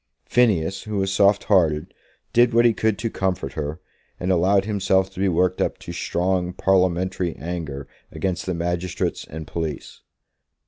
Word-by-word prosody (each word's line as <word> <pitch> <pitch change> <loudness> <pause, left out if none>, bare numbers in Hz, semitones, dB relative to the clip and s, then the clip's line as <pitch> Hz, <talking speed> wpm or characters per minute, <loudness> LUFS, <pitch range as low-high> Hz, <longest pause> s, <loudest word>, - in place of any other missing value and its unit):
Phineas, 95 -6 +2
who 105 -1 -3
was 95 0 0
soft 100 +1 +4
hearted, 80 -7 +2 0.4
did 120 0 +4
what 120 0 +5
he 120 - +5
could 110 -1 0
to 115 - -2
comfort 90 -8 -2
her, 75 +1 -4 0.4
and 90 +2 0
allowed 95 +3 +3
himself 95 -2 +1
to 95 - -10
be 100 - +2
worked 90 +1 +1
up - - 0
to - - -8
strong 90 0 -1
parliamentary 95 -1 +1
anger 80 -5 -5 0.2
against 95 -1 -3
the 90 - -1
magistrates 85 +1 -2
and 80 +1 -8
police. 80 -4 -5
95 Hz, 155 wpm, -23 LUFS, 85-100 Hz, 0.4 s, what